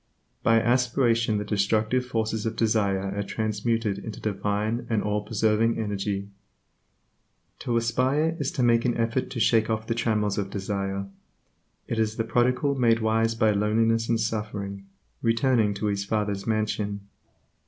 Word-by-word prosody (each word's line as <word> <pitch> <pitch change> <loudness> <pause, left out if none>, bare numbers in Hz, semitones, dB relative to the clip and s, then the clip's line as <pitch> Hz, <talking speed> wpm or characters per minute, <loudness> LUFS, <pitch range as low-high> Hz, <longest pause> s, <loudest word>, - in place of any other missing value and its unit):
By 115 0 +4
aspiration 120 -2 +2
the 105 - -3
destructive 110 +4 +1
forces 110 -2 -2
of 110 - -3
desire 100 -3 0
are 100 - -1
transmuted 110 0 -1
into 110 +1 -7
divine 105 +2 -2
and 110 -3 +1
all 105 0 0
preserving 110 +2 +1
energy. 100 -2 -2 1.3
To 120 -1 -1
aspire 130 +7 +1
is - - -1
to 130 - 0
make 115 -1 +4
an 120 - 0
effort 115 +2 0
to 120 - -5
shake 110 -1 +3
off 110 0 -1
the 115 - -1
trammels 105 -3 0
of 100 -1 -3
desire; 100 0 -3 0.8
it 115 - -2
is 110 -1 0
the 115 - -1
prodigal 125 +4 +1
made 120 -4 +3
wise 115 0 +1
by 110 -1 +3
loneliness 115 +2 +1
and 115 -1 +2
suffering, 105 -3 -4 0.3
returning 115 -2 +2
to 105 - -3
his 100 -1 0
Father's 105 -1 -2
Mansion. 105 -2 -1
110 Hz, 150 wpm, -26 LUFS, 105-115 Hz, 1.3 s, By